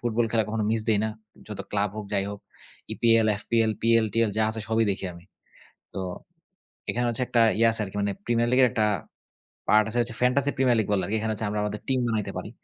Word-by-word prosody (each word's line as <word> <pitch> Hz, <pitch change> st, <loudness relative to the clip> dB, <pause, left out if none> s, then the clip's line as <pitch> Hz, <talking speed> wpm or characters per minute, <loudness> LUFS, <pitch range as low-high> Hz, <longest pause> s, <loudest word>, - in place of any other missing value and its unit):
Football 120 Hz, 0 st, +1 dB
খেলা 110 Hz, -2 st, +2 dB
কখনো 110 Hz, -1 st, -1 dB
miss 115 Hz, -, 0 dB
দেই 105 Hz, -2 st, +3 dB
না। 110 Hz, -, -1 dB, 0.4 s
যত 105 Hz, -, -6 dB
ক্লাব 100 Hz, -1 st, +1 dB
হোক, 105 Hz, -2 st, -5 dB
যাই 100 Hz, 0 st, +1 dB
হোক, 100 Hz, -, -8 dB, 0.5 s
EPL, 115 Hz, -1 st, +3 dB
FPL, 115 Hz, -1 st, +1 dB
PL, 115 Hz, -1 st, +4 dB
TL 115 Hz, -2 st, +2 dB
যা 110 Hz, -, +3 dB
আছে 110 Hz, 0 st, -5 dB
সবই 110 Hz, 0 st, +2 dB
দেখি 95 Hz, -, -4 dB
আমি। 85 Hz, 0 st, -14 dB, 0.7 s
তো -, -, -4 dB, 0.9 s
এখানে 120 Hz, 0 st, -1 dB
হচ্ছে 120 Hz, +2 st, -1 dB
একটা 120 Hz, -, +2 dB, 0.2 s
ইয়া 115 Hz, 0 st, +5 dB
আছে 110 Hz, -, -2 dB
আরকি 95 Hz, +1 st, -9 dB
মানে, 100 Hz, 0 st, 0 dB
প্রিমিয়ার 120 Hz, 0 st, +2 dB
লীগের 130 Hz, 0 st, +6 dB
একটা 110 Hz, -, +2 dB, 0.8 s
পার্ট 105 Hz, 0 st, +5 dB
আছে 120 Hz, -, -2 dB
হচ্ছে 115 Hz, -1 st, -6 dB
ফ্যান্টাসি 135 Hz, +3 st, +2 dB
প্রিমিয়ার 125 Hz, -3 st, +3 dB
লীগ 110 Hz, -, -1 dB
বলে 95 Hz, -, +2 dB
আরকি। 110 Hz, +2 st, -1 dB
এখানে 110 Hz, 0 st, -1 dB
হচ্ছে 110 Hz, +1 st, -3 dB
আমরা 105 Hz, 0 st, -2 dB
আমাদের 105 Hz, 0 st, -4 dB
টিম 130 Hz, -1 st, +1 dB
বানাইতে 110 Hz, -3 st, -2 dB
পারি। -, -, -6 dB
110 Hz, 220 wpm, -26 LUFS, 105-115 Hz, 0.9 s, লীগের